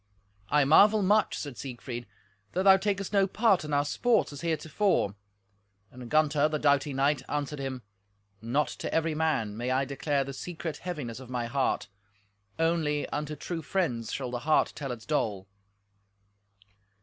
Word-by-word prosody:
"I 145 Hz, -1 st, +4 dB
marvel 205 Hz, +8 st, +6 dB
much," 210 Hz, +3 st, +3 dB
said 140 Hz, -5 st, -6 dB
Siegfried, 120 Hz, -2 st, -6 dB, 0.5 s
"that 185 Hz, -, 0 dB
thou 195 Hz, -1 st, +8 dB
takest 200 Hz, 0 st, -2 dB
no 195 Hz, -1 st, +4 dB
part 205 Hz, -3 st, +2 dB
in 150 Hz, -, -6 dB
our 145 Hz, 0 st, +2 dB
sports 225 Hz, +3 st, +1 dB
as 140 Hz, -, -8 dB
heretofore." 160 Hz, -, 0 dB, 0.8 s
And 125 Hz, -1 st, -10 dB
Gunther, 150 Hz, -1 st, +3 dB
the 155 Hz, -, -1 dB
doughty 145 Hz, -1 st, +2 dB
knight, 135 Hz, +1 st, +1 dB
answered 150 Hz, 0 st, -3 dB
him, 130 Hz, -2 st, -4 dB, 0.6 s
"Not 130 Hz, +6 st, +1 dB
to -, -, -5 dB
every 165 Hz, 0 st, +1 dB
man 150 Hz, -10 st, 0 dB
may 120 Hz, +3 st, -3 dB
I 130 Hz, +1 st, +1 dB
declare 140 Hz, +1 st, -1 dB
the 140 Hz, +1 st, -7 dB
secret 165 Hz, +1 st, -5 dB
heaviness 145 Hz, -10 st, -5 dB
of 130 Hz, -2 st, -11 dB
my 125 Hz, -2 st, -2 dB
heart; 130 Hz, +3 st, 0 dB, 0.7 s
only 160 Hz, -3 st, +1 dB
unto 150 Hz, 0 st, -3 dB
true 165 Hz, +2 st, -5 dB
friends 135 Hz, -, -1 dB
shall 130 Hz, -3 st, -3 dB
the 120 Hz, -, -3 dB
heart 155 Hz, +5 st, +2 dB
tell 135 Hz, -3 st, -4 dB
its 115 Hz, -2 st, -7 dB
dole." 105 Hz, -11 st, -1 dB
150 Hz, 160 wpm, -28 LUFS, 130-165 Hz, 0.8 s, thou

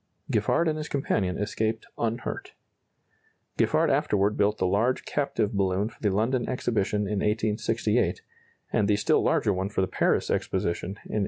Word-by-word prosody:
Giffard 170 Hz, -, +2 dB
and 155 Hz, -1 st, 0 dB
his 150 Hz, -, -5 dB
companion 100 Hz, -9 st, 0 dB
escaped 110 Hz, +2 st, -2 dB
unhurt. 115 Hz, +1 st, -3 dB, 1.1 s
Giffard -, -, +3 dB
afterward 105 Hz, +1 st, +2 dB
built 105 Hz, +1 st, +2 dB
the -, -, 0 dB
large 110 Hz, +7 st, +1 dB
captive 115 Hz, -6 st, -1 dB
balloon 100 Hz, +1 st, +1 dB
for -, -, -20 dB
the 105 Hz, -, +2 dB
London 115 Hz, +6 st, 0 dB
Exhibition 105 Hz, -5 st, 0 dB
in 105 Hz, 0 st, -1 dB
1868, 105 Hz, +1 st, 0 dB, 0.5 s
and 105 Hz, -, +2 dB
the 105 Hz, -, +3 dB
still 105 Hz, -, +2 dB
larger 105 Hz, -, +2 dB
one 95 Hz, +1 st, -2 dB
for 105 Hz, -, -1 dB
the -, -, +3 dB
Paris -, -, +1 dB
Exposition 85 Hz, 0 st, -1 dB
in -, -, -5 dB
1878. 100 Hz, +2 st, -5 dB
105 Hz, 160 wpm, -27 LUFS, 100-115 Hz, 1.1 s, Giffard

